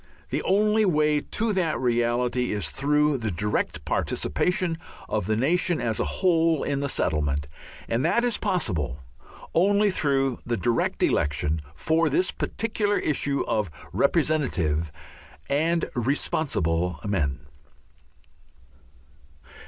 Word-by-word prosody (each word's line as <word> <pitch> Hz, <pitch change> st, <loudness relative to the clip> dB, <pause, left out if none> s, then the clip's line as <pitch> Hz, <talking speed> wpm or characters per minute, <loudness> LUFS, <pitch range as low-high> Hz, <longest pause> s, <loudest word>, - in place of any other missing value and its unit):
The -, -, 0 dB
only 210 Hz, +3 st, +3 dB
way 150 Hz, -5 st, +3 dB
to 220 Hz, +6 st, -1 dB
that 170 Hz, -9 st, 0 dB
reality 120 Hz, 0 st, +1 dB
is 100 Hz, -8 st, -2 dB
through 150 Hz, 0 st, +2 dB
the 110 Hz, -2 st, -2 dB
direct 85 Hz, -5 st, -2 dB
participation 180 Hz, -, 0 dB, 0.3 s
of -, -, -2 dB
the 110 Hz, -, +1 dB
nation 170 Hz, +8 st, +1 dB
as 110 Hz, -2 st, -1 dB
a -, -, +2 dB
whole 165 Hz, -4 st, +2 dB
in 140 Hz, -1 st, -1 dB
the 140 Hz, 0 st, -1 dB
settlement, 75 Hz, -, 0 dB, 0.4 s
and 115 Hz, +3 st, 0 dB
that 235 Hz, +9 st, +2 dB
is 240 Hz, -3 st, 0 dB
possible 85 Hz, -, -1 dB, 0.5 s
only 200 Hz, +4 st, +3 dB
through 135 Hz, -6 st, 0 dB
the 120 Hz, -1 st, -2 dB
direct 120 Hz, 0 st, 0 dB
election 75 Hz, +2 st, +1 dB
for 160 Hz, -, +1 dB
this 185 Hz, +7 st, +2 dB
particular 210 Hz, -2 st, -1 dB
issue 140 Hz, -1 st, 0 dB
of 105 Hz, -4 st, 0 dB, 0.2 s
representative 85 Hz, -, +1 dB, 0.6 s
and 165 Hz, +4 st, +2 dB
responsible 90 Hz, -, 0 dB
men. 75 Hz, -8 st, -1 dB
140 Hz, 115 wpm, -25 LUFS, 100-165 Hz, 0.6 s, only